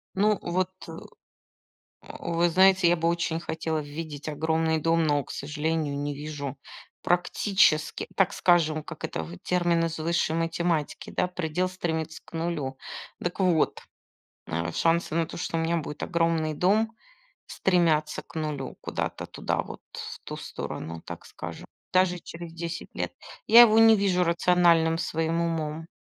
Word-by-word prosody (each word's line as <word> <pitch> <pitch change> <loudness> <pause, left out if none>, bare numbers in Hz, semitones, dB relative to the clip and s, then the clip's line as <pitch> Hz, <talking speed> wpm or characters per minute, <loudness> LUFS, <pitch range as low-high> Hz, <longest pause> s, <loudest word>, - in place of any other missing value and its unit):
Ну, 210 +2 +3
вот, 180 +1 0 0.2
э, - - -8 1.3
вы 170 0 +1
знаете, 190 +1 +5
я 175 - +4
бы 165 0 +1
очень 170 -1 0
хотела 160 -1 -2
видеть 150 0 -6
огромный 160 +1 +1
дом, 165 +1 +2
но, 145 -2 +2
к - - -15
сожалению, 150 0 -2
не 145 0 -2
вижу 145 -1 -5 0.5
практически, 180 -2 +2
так 195 - +3
скажем, 160 -3 +3
как - - -9
это 80 - -3
в 85 +3 -9
термин 175 -2 +1
из 165 0 -4
высшей 165 0 0
математики, 165 -2 -1
да, - - 0
предел 180 0 -2
стремится 160 -3 -3
к - - -19
0. 160 -5 -3 0.4
Дак 175 +2 -3
вот, 180 -4 +2 0.7
а 80 +1 -2
шансы 165 - +1
на 165 0 +1
то, 165 - -9
что 170 - -2
у 165 - +1
меня 170 +1 +1
будет 150 -1 -6
огромный 165 -2 +1
дом, 215 +7 +2 0.5
стремятся 160 -5 +1
к - - -19
0 150 -4 -4
куда-то - - -3
туда, - - -2
вот - - -9
в - - -7
ту - - -6
сторону, 80 0 -6
так - - -8
скажем, - - -8 0.3
даже 185 -1 +3
через 170 0 -9
10 170 0 -5
лет. - - -2 0.4
Я 235 - +10
его 225 -2 +7
не 225 0 +8
вижу 190 -3 +2
рациональным 170 -1 +3
своим 165 0 -1
умом. 160 -1 -2
165 Hz, 150 wpm, -27 LUFS, 155-175 Hz, 1.3 s, Я